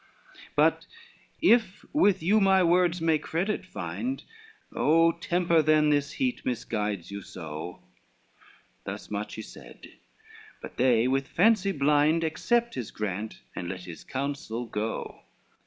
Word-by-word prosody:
LXXXIII -, -, -22 dB
"But -, -, +3 dB, 0.6 s
if 230 Hz, -, +3 dB
with 205 Hz, -, +3 dB
you 205 Hz, +6 st, +4 dB
my 190 Hz, -1 st, +5 dB
words 175 Hz, 0 st, +3 dB
may 160 Hz, -2 st, +2 dB
credit 185 Hz, +5 st, -2 dB
find, 255 Hz, +7 st, -4 dB, 0.5 s
Oh 165 Hz, +2 st, +4 dB
temper 170 Hz, 0 st, +1 dB
then 155 Hz, 0 st, +4 dB
this 145 Hz, 0 st, 0 dB
heat 255 Hz, -2 st, -1 dB
misguides 105 Hz, -6 st, -3 dB
you 100 Hz, 0 st, -5 dB
so!" 80 Hz, -1 st, -8 dB, 1.0 s
Thus -, -, -7 dB
much 105 Hz, 0 st, -4 dB
he 110 Hz, -, -6 dB
said, -, -, -13 dB, 0.7 s
but -, -, -10 dB
they 125 Hz, -2 st, +3 dB
with 135 Hz, +1 st, 0 dB
fancy 200 Hz, +3 st, +3 dB
blind, 150 Hz, +2 st, +3 dB
Accept 235 Hz, +9 st, 0 dB
his 120 Hz, -4 st, -5 dB
grant, 105 Hz, +1 st, -5 dB
and 85 Hz, -, -4 dB
let 90 Hz, 0 st, -5 dB
his 90 Hz, -2 st, -10 dB
counsel 135 Hz, -4 st, -4 dB
go. 110 Hz, 0 st, -4 dB
150 Hz, 135 wpm, -27 LUFS, 110-180 Hz, 1.0 s, my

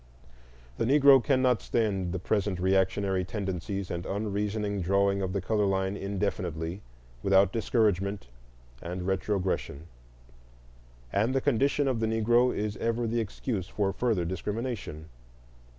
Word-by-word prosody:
The -, -, +1 dB
Negro 135 Hz, 0 st, +6 dB
cannot 130 Hz, -4 st, +2 dB
stand 100 Hz, -6 st, 0 dB
the 95 Hz, -, -2 dB
present 100 Hz, 0 st, -1 dB
reactionary 95 Hz, 0 st, +1 dB
tendencies 95 Hz, 0 st, -4 dB
and 85 Hz, 0 st, -3 dB
unreasoning 105 Hz, 0 st, -2 dB
drawing 100 Hz, +2 st, +2 dB
of 95 Hz, -1 st, -2 dB
the 100 Hz, 0 st, -1 dB
color 105 Hz, +1 st, +1 dB
line 95 Hz, 0 st, 0 dB
indefinitely 95 Hz, -4 st, -3 dB, 0.4 s
without 95 Hz, 0 st, +4 dB
discouragement 105 Hz, -, 0 dB, 0.6 s
and 90 Hz, +1 st, -5 dB
retrogression. 95 Hz, -5 st, -1 dB, 1.3 s
And 110 Hz, +6 st, +1 dB
the -, -, +4 dB
condition 140 Hz, +2 st, +1 dB
of 130 Hz, -4 st, 0 dB
the 110 Hz, -, 0 dB
Negro 120 Hz, +3 st, +3 dB
is 105 Hz, 0 st, -3 dB
ever 115 Hz, +1 st, -1 dB
the 115 Hz, +1 st, 0 dB
excuse 105 Hz, -2 st, -4 dB
for 100 Hz, -2 st, -1 dB
further 110 Hz, -8 st, 0 dB
discrimination. 105 Hz, -3 st, -4 dB
100 Hz, 125 wpm, -28 LUFS, 95-115 Hz, 1.3 s, Negro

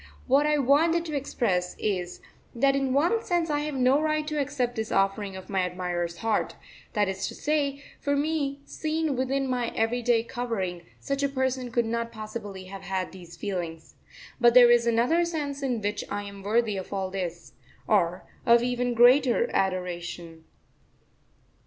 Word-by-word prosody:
What 280 Hz, +3 st, +4 dB
I 300 Hz, 0 st, +3 dB
wanted 320 Hz, +5 st, +3 dB
to 310 Hz, -3 st, -4 dB
express 205 Hz, -10 st, -1 dB
is, 180 Hz, -4 st, -2 dB, 0.3 s
that 275 Hz, +3 st, +3 dB
in 270 Hz, -1 st, 0 dB
one 340 Hz, -, +2 dB
sense 345 Hz, -3 st, 0 dB
I 290 Hz, -, +1 dB
have 295 Hz, -1 st, -3 dB
no 260 Hz, +3 st, +3 dB
right 310 Hz, -1 st, 0 dB
to 300 Hz, -1 st, 0 dB
accept 260 Hz, -3 st, -2 dB
this 220 Hz, -1 st, -3 dB
offering 195 Hz, 0 st, 0 dB
of 190 Hz, -, -9 dB
my 195 Hz, -2 st, 0 dB
admirer's 175 Hz, -1 st, -2 dB
heart; 225 Hz, -, 0 dB, 0.4 s
that 205 Hz, -1 st, +2 dB
is 190 Hz, 0 st, -2 dB
to -, -, -7 dB
say, 290 Hz, -2 st, -1 dB, 0.2 s
for 285 Hz, 0 st, 0 dB
me, 285 Hz, -1 st, -1 dB
seen 315 Hz, -2 st, -2 dB
within 265 Hz, +1 st, 0 dB
my 250 Hz, -2 st, -1 dB
everyday 235 Hz, 0 st, +2 dB
covering, 225 Hz, -8 st, -3 dB, 0.2 s
such 275 Hz, 0 st, -2 dB
a 280 Hz, -, +1 dB
person 260 Hz, -2 st, -1 dB
could 235 Hz, 0 st, +1 dB
not 230 Hz, +1 st, -2 dB
possibly 215 Hz, -3 st, -7 dB
have 195 Hz, +1 st, -9 dB
had 190 Hz, -1 st, -3 dB
these 175 Hz, -2 st, -12 dB
feelings. 170 Hz, -5 st, -5 dB, 0.5 s
But 240 Hz, -1 st, +5 dB
there 245 Hz, -1 st, +9 dB
is 240 Hz, 0 st, +4 dB
another 245 Hz, +9 st, +3 dB
sense 295 Hz, -5 st, -3 dB
in 250 Hz, -5 st, -1 dB
which 205 Hz, +1 st, -2 dB
I 205 Hz, -, -3 dB
am 200 Hz, -1 st, -9 dB
worthy 215 Hz, +1 st, +1 dB
of 190 Hz, -, -6 dB
all 190 Hz, -1 st, -2 dB
this, 175 Hz, -3 st, -5 dB, 0.3 s
or 180 Hz, -4 st, +1 dB, 0.2 s
of 235 Hz, 0 st, +5 dB
even 245 Hz, 0 st, 0 dB
greater 255 Hz, -, +5 dB
adoration. 175 Hz, -3 st, -3 dB
240 Hz, 170 wpm, -27 LUFS, 195-280 Hz, 0.5 s, there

